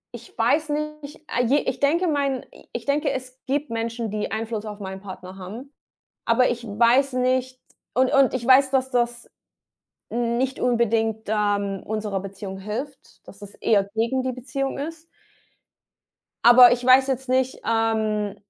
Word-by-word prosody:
ich - - -13
weiß 310 +1 +2
nicht, 305 0 -4
ah, 245 - 0
je 250 +4 +3
ich 260 - -3
denke 335 +6 +2
mein 280 -4 -1 0.3
ich 240 - -6
denke, 285 +1 +1
es 260 0 -7
gibt 285 +1 -1
Menschen, 230 -1 -3
die 210 -1 -3
Einfluss 220 0 -3
auf 210 -1 -7
meinen 190 -1 -7
Partner 190 -1 -10
haben, 230 +10 -9 0.5
aber 250 +2 +3
ich 240 0 -4
weiß 235 +6 +3
nicht 255 0 0 0.3
und 255 0 +3
und 275 -1 +4
ich 240 -2 -3
weiß, 265 +1 +6
dass 265 -1 +1
das 240 -1 -1 0.8
nicht 240 +3 -1
unbedingt, 225 -2 0
ähm, 205 -2 0
unserer 210 -2 -3
Beziehung 195 0 -7
hilft, 250 +8 -7
dass 200 - -13
das 205 0 -11
eher 200 -3 +2
gegen 235 +4 0
die 260 - -1
Beziehung 270 +2 -4
ist. 320 +3 -6 1.4
Aber 245 0 +9
ich 245 0 -4
weiß 260 +1 +6
jetzt 265 0 -3
nicht, 260 0 0
ähm, 220 -2 0
240 Hz, 155 wpm, -23 LUFS, 215-265 Hz, 1.4 s, Aber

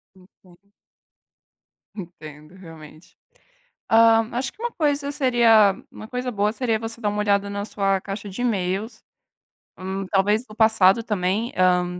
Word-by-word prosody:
Enten 185 +1 -24 1.2
Entendo 155 -4 -11
realmente, 160 -3 -15 0.7
hã, 225 0 +5
acho 250 +3 -3
que 445 - -15
uma 480 - -2
coisa 290 -2 -1
seria 235 -8 +4
uma - - -11
coisa 250 +2 -4
boa 210 -2 0
seria 230 -2 -1
você 225 +1 -2
dar 210 - -1
uma 205 0 -3
olhada 200 -1 +1
na 200 0 -4
sua 195 -2 -1
caixa 200 +2 -7
de 195 +5 -6
e-mails, 210 0 -2 0.8
hum, 190 +1 -5
talvez 205 +4 +1
do 215 - -14
passado 220 -1 +4
também, 210 +2 -2
hã, 180 -1 +1
205 Hz, 140 wpm, -22 LUFS, 185-230 Hz, 1.2 s, hã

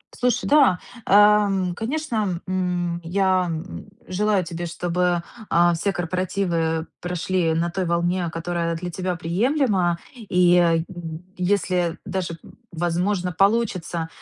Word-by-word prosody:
Слушай, 250 -1 0
да, 280 -11 +5 0.3
эм, 200 -3 +4
конечно, 225 - -2
м, 180 -2 -1
я, 185 +1 +1
м, 165 +5 -6 0.2
желаю 200 +1 +1
тебе, 170 0 -5
чтобы, 175 +1 0 0.3
э, 175 0 +4
все 195 +5 0
корпоративы 175 -2 -1
прошли 175 -1 0
на 165 +2 0
той 185 +1 -2
волне, 175 +1 0
которая 170 0 -2
для 180 +1 -5
тебя 180 +1 -3
приемлема. 185 - +1 0.2
И, 180 -6 +3
э, 165 -2 +3 0.5
если 180 -2 0
даже, 175 -3 -3 0.3
возможно, 175 +2 -1
получится, 195 -5 +1
180 Hz, 115 wpm, -23 LUFS, 170-195 Hz, 0.5 s, да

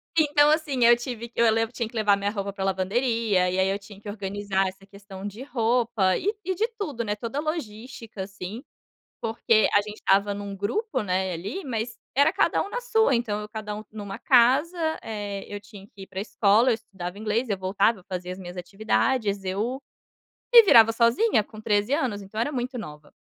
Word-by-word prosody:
Então, 295 -2 +4
assim, 285 -6 +1
eu 240 0 +8
tive 240 -1 -6
que 235 - -3
eu 225 -1 +5
levo 225 +1 0
tinha 230 -2 -3
que 235 - -16
levar 210 -2 +3
a - - +5
minha 200 0 -2
roupa 200 -2 -4
para 195 -1 -4
lavanderia, 195 0 +1
e 185 - -2
aí 190 0 +3
eu 195 +1 -1
tinha 200 0 -14
que 210 - -13
organizar 200 -1 -2
essa 190 +1 -9
questão 200 -1 -11
de 205 +4 -7
roupa 235 -6 +1
e 405 +4 0
e 375 - 0
de 435 +6 0
tudo, 290 - -3
né, 210 -1 -2
toda 230 +6 -4
a - - -1
logística, 235 - -6
assim. 195 +5 -7 0.6
Porque 225 -1 +2
a 205 - +5
gente 210 +1 -9
estava 200 +1 +2
em 200 - -6
um 200 -1 -6
grupo, 415 - -2
né, 185 -2 -1
ali, 200 - -5
mas 230 -2 -3 0.2
era 285 +3 +5
cada - - +2
um 400 - -8
na - - -3
sua. 445 - +2
Então, 215 -3 -1
eu 210 - -8
cada 210 -1 -5
um 215 - -7
em 215 - -9
uma 200 -1 -6
casa, 265 +8 +4 0.2
eh, 205 -2 -5
eu 205 - -4
tinha 205 -1 -13
que 195 -1 -12
ir - - -12
para 190 0 -5
escola, 215 +3 +3
eu 230 - +3
estudava 195 -4 -8
inglês, 220 +3 -1
eu 200 - 0
voltava, 195 +1 +1
fazia 180 -1 -5
as 185 - -6
minhas 180 0 -8
atividades, 205 +3 0
eu, 220 +8 -2 0.7
me 465 - +12
virava 225 - +7
sozinha 235 - +3
com 215 +1 -12
13 210 +3 +1
anos, 245 -9 0
então, 215 +3 -6
era 290 +6 -1
muito 250 0 -3
nova. 150 -8 -9
215 Hz, 215 wpm, -25 LUFS, 200-245 Hz, 0.7 s, me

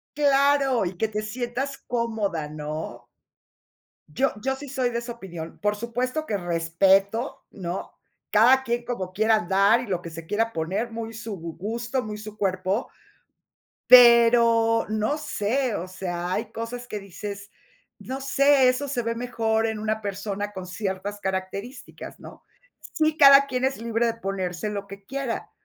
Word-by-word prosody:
Claro, 280 -4 +3
y 175 0 -5
que 220 - +1
te 215 0 -3
sientas 245 +5 -4
cómoda, 220 -9 -1
¿no? 150 -5 -6 1.0
Yo 270 - +1
yo 265 0 0
sí 285 0 -9
soy 255 -2 0
de 235 - -2
esa 240 0 -5
opinión, 175 -7 -9
por 210 0 +1
supuesto 250 +7 -2
que 205 - -1
respeto, 190 - +1
¿no? 180 -1 -5 0.4
Cada 250 +5 +6
quien 235 -1 -2
como 190 -7 -4
quiera 220 +2 +3
andar 200 +5 +3
y 245 - -6
lo 180 -3 -2
que 170 - -7
se 165 0 -9
quiera 225 +4 0
poner, 195 +9 -2
muy 225 0 -6
su 225 -3 -6
gu 165 -1 -7
gusto, 235 +6 -3
muy 210 0 -6
su 215 0 -9
cuerpo, 190 +2 -1 1.0
pero, 235 -2 +7
no 215 +6 0
sé, 260 -4 -1
o 180 - -4
sea, 180 -1 -4
hay 215 - -3
cosas 240 +2 -5
que 210 - -5
dices, 200 +1 -8 0.5
"No 265 +1 -6
sé, 275 0 +4
eso 255 +3 0
se 250 -3 -1
ve 230 0 -2
mejor 225 -2 0
en 220 -1 -3
una 215 0 -1
persona 205 0 -4
con 185 -2 -7
ciertas 195 +2 -4
características", 195 +6 -5
¿no? - - -13 0.5
Sí, 310 -1 +1
cada 275 -2 +8
quien 255 -1 -2
es 265 -3 0
libre 230 0 0
de 230 - 0
ponerse 195 -2 -3
lo 200 -1 -5
que 200 0 -11
quiera, 270 0 -4
220 Hz, 160 wpm, -25 LUFS, 195-245 Hz, 1.0 s, cada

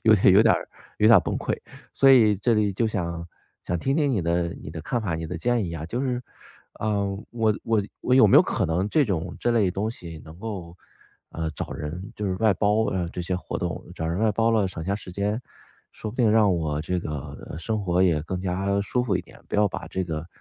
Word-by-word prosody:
有 110 -1 +7
点 95 -2 +5
有 105 - +8
点 115 - +5
儿 - - -4 0.3
有 105 - +4
点 115 - +9
儿 - - +1
崩 - - -2
溃。 - - -1 0.4
所 135 0 +5
以 110 -5 +6
这 110 +4 +2
里 105 -2 +2
就 110 +4 0
想 85 -5 -3 0.4
想 90 - -2
听 135 +10 0
听 145 -3 +2
你 100 - 0
的 85 +1 +1
你 75 - -9
的 80 - -6
看 120 +5 -2
法、 90 -6 -1
你 80 0 -4
的 90 - -5
建 120 +4 +1
议 85 - -5
啊。 80 -1 -5
就 120 +8 -3
是， 125 -2 -1 0.6
呃， 105 -2 0 0.2
我 110 -3 +1
我 110 -3 +2 0.2
我 125 - +2
有 130 -4 +7
没 - - +6
有 - - +9
可 - - -1
能 90 +5 0
这 150 +5 +3
种 90 -8 -3
这 120 - +1
类 105 -6 +3
东 100 +4 -2
西 85 -8 -9
能 80 +2 -12
够， 95 -6 -6 0.6
呃， 80 -1 -3
找 - - -5
人 85 +6 -6
就 105 - -4
是 95 - 0
外 110 +2 +3
包 105 +3 +2
啊， 90 -2 -1
这 90 - -4
些 90 +1 -1
活 90 - -5
动， 85 -4 -4
找 80 - -3
人 85 +2 -1
外 110 0 +2
包 115 +2 +2
了 110 -4 +3
省 85 -3 -6
下 100 +3 0
时 100 -3 -10
间， 105 +4 -1 0.5
说 110 - -6
不 120 - -12
定 120 -4 +4
让 105 -3 +5
我 75 -3 -1
这 90 +3 -1
个 75 -1 -6
生 110 +3 -2
活 90 0 +2
也 80 -5 +3
更 90 +3 -4
加 95 +2 0
舒 125 +5 0
服 110 - 0
一 - - -2
点， - - -17
不 - - -6
要 105 0 +4
把 85 - -6
这 95 +2 -2
个 80 -1 -4
100 Hz, 270 characters per minute, -25 LUFS, 85-110 Hz, 0.6 s, 点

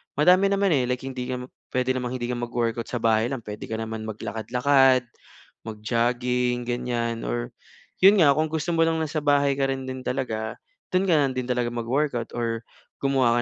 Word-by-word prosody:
madami 180 +7 +5
naman, 200 -1 +2
eh, 130 -5 +2
like 125 +1 -2
hindi 130 -2 -5
ka 125 -1 -3 0.3
pwede 130 0 +2
namang 125 -1 -2
hindi 120 -1 -3
ka 120 - -3
mag-workout 120 -1 -2
sa 120 -2 -4
bahay 110 0 +3
lang 130 -2 -4
pwede 105 0 -7
ka 110 - -3
naman 110 0 -5
maglakad-lakad 125 +5 +2 0.6
mag-jogging, 120 +3 0
ganyan 120 - -2
or - - -3 0.5
iyon 195 0 +7
nga 145 - +7
kung 155 - +3
gusto 160 +2 -3
mo 165 -1 +3
lang 160 0 0
nasa 155 0 -1
bahay 140 -1 +3
ka 135 - +2
rin 130 0 -6
din 130 0 -6
talaga, 110 -4 -2 0.4
do'n 185 +1 +3
ka - - +5
na 140 -3 +2
din 130 0 -4
talaga 120 -1 0
mag-workout 120 +1 -1
or 115 -1 -1 0.4
gumawa 130 -4 +3
125 Hz, 185 wpm, -25 LUFS, 115-140 Hz, 0.6 s, iyon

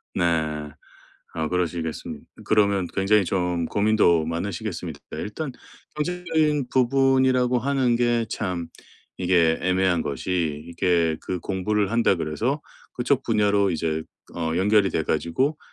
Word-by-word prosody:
네. 80 -3 0 0.7
아 80 -1 -1
그러시겠습 85 -2 -3 0.2
그러면 100 -3 +2
굉장히 100 +1 +3
좀 90 -1 -1
고민도 100 -6 +3
많으시겠습니다. 85 +2 -4 0.2
일단 135 +8 -4 0.5
경제적인 155 -4 0
부분이라고 130 -1 +3
하는 130 -2 +1
게 120 -1 +1
참 90 -7 -3 0.5
이게 85 -3 +3
애매한 95 -2 +2
것이 75 +1 -2
이게 85 -2 +1
그 90 - -3
‘공부를 100 +1 -1
한다 115 -4 +3
그래서 110 - -1 0.3
그쪽 125 +2 0
분야로 105 -3 +2
이제 80 -1 -1 0.3
어 80 -1 -1
연결이 100 +1 +3
돼 80 - 0
가지고 85 - 0
95 Hz, 275 characters per minute, -24 LUFS, 85-120 Hz, 0.7 s, 굉장히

